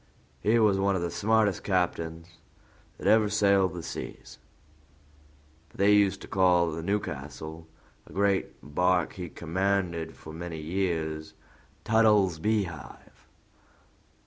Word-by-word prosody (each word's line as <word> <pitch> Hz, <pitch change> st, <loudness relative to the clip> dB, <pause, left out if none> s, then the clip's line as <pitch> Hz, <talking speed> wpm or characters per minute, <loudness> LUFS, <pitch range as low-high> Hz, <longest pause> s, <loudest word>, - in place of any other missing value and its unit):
He 110 Hz, +3 st, +2 dB
was 105 Hz, -4 st, +3 dB
one 100 Hz, 0 st, +2 dB
of 90 Hz, -, -1 dB
the 85 Hz, -, -2 dB
smartest 110 Hz, -1 st, +1 dB
captains 85 Hz, -3 st, -1 dB, 0.7 s
that -, -, -10 dB
ever 110 Hz, -1 st, +4 dB
sailed 100 Hz, -4 st, +3 dB
the 85 Hz, -, -6 dB
seas, -, -, -8 dB, 1.3 s
but -, -, -19 dB
they 100 Hz, +1 st, +4 dB
used 100 Hz, -2 st, +3 dB
to -, -, -9 dB
call 90 Hz, -3 st, +3 dB
the 80 Hz, +1 st, -5 dB
Newcastle, 80 Hz, -4 st, -4 dB, 0.4 s
a -, -, -15 dB
great 100 Hz, 0 st, +1 dB, 0.2 s
bark 90 Hz, +4 st, +1 dB
he 90 Hz, -2 st, -7 dB
commanded 85 Hz, -1 st, -2 dB
for 80 Hz, -, -11 dB
many 85 Hz, -1 st, -6 dB
years, 80 Hz, -2 st, -2 dB, 0.5 s
Tuttle's 105 Hz, -6 st, +3 dB
beehive. 95 Hz, -4 st, -4 dB
90 Hz, 120 wpm, -28 LUFS, 80-100 Hz, 1.3 s, ever